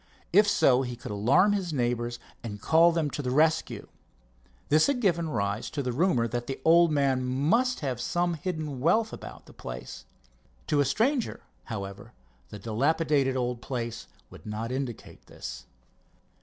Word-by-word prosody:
If 205 Hz, +3 st, +6 dB
so, 130 Hz, -10 st, +4 dB
he 125 Hz, -2 st, -4 dB
could 120 Hz, -, -8 dB
alarm 130 Hz, -, +3 dB
his 190 Hz, -4 st, -2 dB
neighbors 120 Hz, -3 st, -1 dB, 0.3 s
and 105 Hz, -3 st, -6 dB
call 165 Hz, +9 st, +5 dB
them 160 Hz, -3 st, -1 dB
to -, -, -3 dB
the 125 Hz, -, -3 dB
rescue. 155 Hz, +5 st, +1 dB, 0.8 s
This 155 Hz, +1 st, +5 dB
had 280 Hz, -3 st, +1 dB
given 170 Hz, -7 st, +1 dB
rise 100 Hz, -4 st, -2 dB
to 145 Hz, -, -3 dB
the 125 Hz, -, -1 dB
rumor 130 Hz, -4 st, +2 dB
that 120 Hz, +1 st, -4 dB
the 135 Hz, -, -4 dB
old 170 Hz, 0 st, +6 dB
man 135 Hz, -3 st, +1 dB
must 160 Hz, -, +1 dB
have 130 Hz, -5 st, -2 dB
some 175 Hz, +4 st, 0 dB
hidden 155 Hz, -4 st, -4 dB
wealth 215 Hz, -, +2 dB
about -, -, -9 dB
the -, -, -15 dB
place. -, -, -8 dB, 0.6 s
To 150 Hz, -, +1 dB
a 145 Hz, -, +4 dB
stranger, 230 Hz, -, 0 dB, 0.2 s
however, 100 Hz, -4 st, -7 dB, 0.4 s
the -, -, -8 dB
dilapidated 135 Hz, +5 st, +1 dB
old 125 Hz, -1 st, -2 dB
place 120 Hz, -3 st, -5 dB, 0.2 s
would -, -, -13 dB
not 110 Hz, +3 st, -4 dB
indicate 130 Hz, -3 st, -6 dB
this. -, -, -8 dB
135 Hz, 160 wpm, -28 LUFS, 120-165 Hz, 0.8 s, If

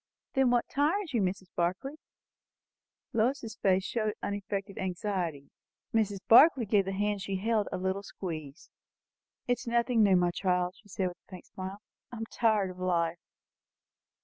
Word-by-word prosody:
"Then 265 Hz, -2 st, +3 dB
what 240 Hz, -1 st, +2 dB
tires 315 Hz, +4 st, 0 dB
you, 230 Hz, -, +2 dB
dear 185 Hz, -, +3 dB
Mrs. 190 Hz, -1 st, -13 dB
Barclay?" 185 Hz, +11 st, -1 dB, 1.2 s
Lois's 230 Hz, 0 st, 0 dB
face 190 Hz, -1 st, +2 dB
showed 215 Hz, -3 st, -1 dB
unaffected 200 Hz, 0 st, -4 dB
anxiety. 180 Hz, -6 st, -3 dB, 0.4 s
Mrs. 210 Hz, -3 st, +1 dB
Barclay 265 Hz, +1 st, +7 dB
gave 205 Hz, -1 st, +3 dB
the 195 Hz, -, -2 dB
hand 205 Hz, +1 st, -1 dB
she 195 Hz, +1 st, -3 dB
held 215 Hz, +2 st, +1 dB
a -, -, -2 dB
little 190 Hz, +2 st, -1 dB
squeeze. 160 Hz, -6 st, -7 dB, 0.8 s
"It 245 Hz, 0 st, +1 dB
is -, -, -10 dB
nothing 235 Hz, 0 st, +2 dB
new, 200 Hz, -3 st, +5 dB
my 175 Hz, -1 st, +3 dB
child," 180 Hz, -1 st, 0 dB
she 210 Hz, -, -21 dB
said, 185 Hz, -1 st, -1 dB
with 175 Hz, -, -12 dB
a -, -, -44 dB
faint 185 Hz, -3 st, -10 dB
smile. 190 Hz, +2 st, -8 dB, 0.3 s
"I 240 Hz, -, -7 dB
am 225 Hz, -, -4 dB
tired 215 Hz, -5 st, +2 dB
of 180 Hz, -, -12 dB
life." 170 Hz, -2 st, 0 dB
200 Hz, 165 wpm, -30 LUFS, 185-225 Hz, 1.2 s, Barclay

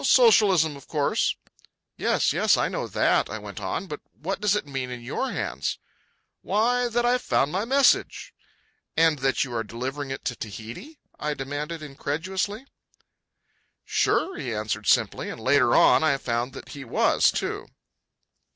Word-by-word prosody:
"Socialism, 195 Hz, -, +5 dB
of 140 Hz, -, -13 dB
course." 145 Hz, -3 st, +1 dB, 0.6 s
"Yes, -, -, +1 dB
yes, -, -, +3 dB
I -, -, +1 dB
know -, -, -3 dB
that," -, -, +2 dB
I 110 Hz, -, -4 dB
went 100 Hz, -2 st, -8 dB
on; 95 Hz, -, -3 dB
"but 150 Hz, -5 st, -6 dB, 0.2 s
what 190 Hz, +6 st, -3 dB
does 210 Hz, -1 st, +3 dB
it 210 Hz, -, -2 dB
mean 135 Hz, -3 st, -4 dB
in 125 Hz, -1 st, -7 dB
your -, -, -2 dB
hands?" 70 Hz, +5 st, -3 dB, 0.6 s
"Why, 240 Hz, +5 st, +1 dB
that 240 Hz, +1 st, 0 dB
I've 250 Hz, +1 st, +2 dB
found 140 Hz, -, +1 dB
my 190 Hz, +5 st, -1 dB
message." 275 Hz, +3 st, +2 dB, 0.6 s
"And 160 Hz, -2 st, +4 dB
that 135 Hz, -2 st, +1 dB
you 130 Hz, -3 st, -6 dB
are 115 Hz, -1 st, -1 dB
delivering 130 Hz, +6 st, -5 dB
it 135 Hz, -, -6 dB
to 125 Hz, -, -1 dB
Tahiti?" 115 Hz, -, -8 dB, 0.2 s
I 150 Hz, 0 st, -2 dB
demanded 145 Hz, +4 st, -5 dB
incredulously. 185 Hz, -, -3 dB, 1.2 s
"Sure," 385 Hz, -, +1 dB
he 125 Hz, -, -4 dB
answered 105 Hz, 0 st, -3 dB
simply; -, -, +2 dB
and -, -, -7 dB
later 125 Hz, +1 st, +3 dB
on -, -, +6 dB
I 145 Hz, -3 st, +3 dB
found 120 Hz, 0 st, -2 dB
that 135 Hz, -, -10 dB
he 140 Hz, -, -8 dB
was, 115 Hz, -, +3 dB
too. -, -, -3 dB
145 Hz, 160 wpm, -25 LUFS, 125-195 Hz, 1.2 s, on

